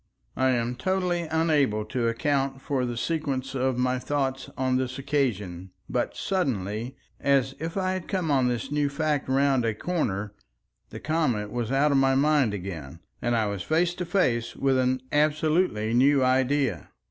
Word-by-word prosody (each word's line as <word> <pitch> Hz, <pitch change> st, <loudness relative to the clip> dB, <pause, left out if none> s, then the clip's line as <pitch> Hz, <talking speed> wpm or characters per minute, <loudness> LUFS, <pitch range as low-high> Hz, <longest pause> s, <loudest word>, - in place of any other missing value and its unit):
I 130 Hz, 0 st, +2 dB
am 120 Hz, -1 st, 0 dB
totally 180 Hz, +2 st, 0 dB
unable 150 Hz, -10 st, +2 dB
to 115 Hz, +2 st, -1 dB
account 135 Hz, +2 st, 0 dB
for 135 Hz, -2 st, -1 dB
the 120 Hz, -1 st, -4 dB
sequence 140 Hz, -3 st, -2 dB
of 130 Hz, -1 st, 0 dB
my 125 Hz, 0 st, +1 dB
thoughts 135 Hz, -1 st, -2 dB
on 130 Hz, -1 st, +1 dB
this 130 Hz, 0 st, -2 dB
occasion. 105 Hz, -11 st, -2 dB, 0.2 s
But -, -, -2 dB
suddenly, 120 Hz, -, -2 dB, 0.2 s
as 135 Hz, -1 st, +2 dB
if 165 Hz, +3 st, -4 dB
I 185 Hz, -1 st, 0 dB
had 185 Hz, -2 st, -4 dB
come 180 Hz, -6 st, -1 dB
on 130 Hz, -3 st, +3 dB
this 125 Hz, +3 st, -2 dB
new 145 Hz, -1 st, +1 dB
fact 150 Hz, -1 st, -1 dB
round 135 Hz, -1 st, +3 dB
a 115 Hz, -2 st, 0 dB
corner, 105 Hz, -, -2 dB, 0.6 s
the -, -, -8 dB
comet 125 Hz, -10 st, 0 dB
was 120 Hz, -1 st, -2 dB
out 140 Hz, +2 st, +3 dB
of 140 Hz, -, +3 dB
my 135 Hz, 0 st, +3 dB
mind 145 Hz, -4 st, +3 dB
again, 85 Hz, -6 st, -7 dB, 0.2 s
and 120 Hz, 0 st, +1 dB
I 110 Hz, -2 st, +2 dB
was 100 Hz, -2 st, -3 dB
face 170 Hz, -, +1 dB
to 180 Hz, 0 st, -4 dB
face 125 Hz, -12 st, 0 dB
with 135 Hz, -1 st, +2 dB
an 130 Hz, 0 st, +1 dB
absolutely 150 Hz, -6 st, +1 dB
new 135 Hz, +2 st, +4 dB
idea. 130 Hz, -, +1 dB
135 Hz, 170 wpm, -26 LUFS, 120-150 Hz, 0.6 s, new